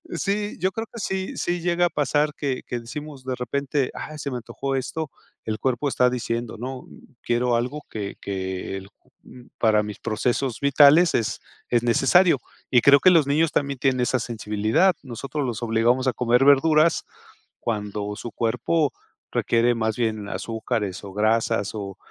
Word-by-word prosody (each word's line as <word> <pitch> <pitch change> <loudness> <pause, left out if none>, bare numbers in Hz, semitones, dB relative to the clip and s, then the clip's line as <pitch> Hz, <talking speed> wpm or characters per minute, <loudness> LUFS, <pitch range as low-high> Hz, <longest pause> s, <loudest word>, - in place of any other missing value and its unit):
Sí, 205 +1 -2
yo 190 +1 +1
creo 225 +3 -5
que 235 - -10
sí, 190 -1 -3
sí 175 -1 -1
llega 175 0 +2
a - - -6
pasar 150 0 +1
que, 135 -3 -2
que 120 - -3
decimos 140 +3 -8
de 130 -1 -2
repente: 135 +2 -1
"Ay, 155 - -7
se 140 -1 -4
me 125 - -3
antojó 135 +3 -4
esto", 140 +3 -3 0.4
el 110 -1 -3
cuerpo 130 +2 0
está 125 -1 +3
diciendo 120 -1 -3
¿no? 130 +1 -6 0.3
"Quiero 120 0 +1
algo", 125 +6 -2
que 100 -2 -5
que 95 -1 -4
el 95 0 -10 0.7
para 105 -1 +3
mis 105 -1 -7
procesos 120 +3 -1
vitales 145 +4 +6
es 115 - -1 0.3
es 120 -1 +2
necesario, 140 +7 +4 0.3
y 120 - +5
creo 140 +3 +7
que 185 - +7
los 160 -5 +4
niños 155 +3 +2
también 140 -1 -1
tienen 130 -1 +1
esa 125 +1 +1
sensibilidad. 110 - +1
Nosotros 135 +3 -4
los 120 -1 -3
obligamos 120 +3 +2
a 130 - +2
comer 125 +2 +2
verduras 155 +3 +4 0.6
cuando 105 -2 -3
su 120 - -7
cuerpo 125 +8 0 0.4
requiere 120 +1 +2
más 110 -1 -1
bien 110 -3 -1
azúcares, 105 -1 -3
o, 100 - -8
grasas, 110 0 +1
o 100 -2 -6
125 Hz, 165 wpm, -24 LUFS, 110-145 Hz, 0.7 s, creo